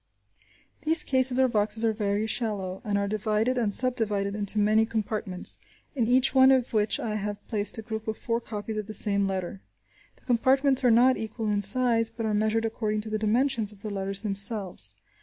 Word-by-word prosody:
These 315 +2 +1
cases 260 -1 +1
or 260 - +4
boxes 220 0 -1
are 225 - +1
very 210 0 -2
shallow, 205 -5 -3
and 205 -1 -1
are 200 0 -1
divided 215 +4 -1
and 230 -4 -1
subdivided 210 -5 +3
into 210 0 0
many 215 +1 +3
compartments, 215 -4 -3 0.3
in 240 -6 -1
each 255 +2 +2
one 265 -1 +6
of 260 -2 +1
which 210 -1 0
I 215 -2 -3
have 205 0 -6
placed 210 -2 0
a 225 - -7
group 220 0 -6
of 220 - -3
four 230 0 -3
copies 215 -1 -6
of 210 -1 -5
the 215 - -1
same 200 -2 +2
letter. 190 0 -5 0.5
The - - -26
compartments 265 +2 +2
are 250 - +4
not 245 +3 +4
equal 220 0 -5
in 205 -1 0
size, 230 +2 +3
but 225 0 -6
are 215 - -1
measured 220 +2 0
according 215 -1 -3
to 215 - -8
the 215 - -2
dimensions 225 0 +1
of 205 -2 -17
the 215 - -5
letters 195 +1 -3
themselves. 195 - +1
220 Hz, 195 wpm, -26 LUFS, 205-235 Hz, 0.5 s, one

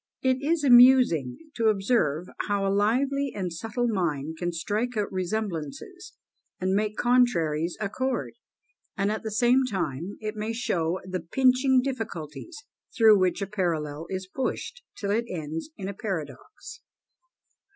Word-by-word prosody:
It 260 0 +2
is 310 +2 0
amusing 245 - +6 0.2
to 225 -1 +2
observe 195 - +1 0.2
how 200 -1 0
a 195 - +1
lively 265 +7 +1
and 185 -4 -3
subtle 225 +7 -2
mind 160 -7 -2
can 175 -1 -1
strike 215 +8 -2
out 205 -1 -1
resemblances, 195 - -4 0.5
and 185 +1 0
make 210 +1 0
contraries 175 -10 +2
accord, 250 +5 -2 0.6
and 200 +1 +1
at 215 - -3
the 220 - -4
same 240 +5 +3
time 175 - -3
it 215 0 -5
may 215 +2 -3
show 180 -6 -1
the 185 0 -4
pinching 255 - +3
difficulties 250 - -6 0.3
through 220 -3 +7
which 185 +2 +1
a - - -1
parallel 165 -6 -2
is 190 0 -4
pushed, 265 - -4 0.2
till 200 -1 -2
it 230 +3 +1
ends 160 - -5
in 195 -3 -5
a 200 - -4
paradox. 165 - -7
205 Hz, 140 wpm, -26 LUFS, 170-245 Hz, 0.6 s, through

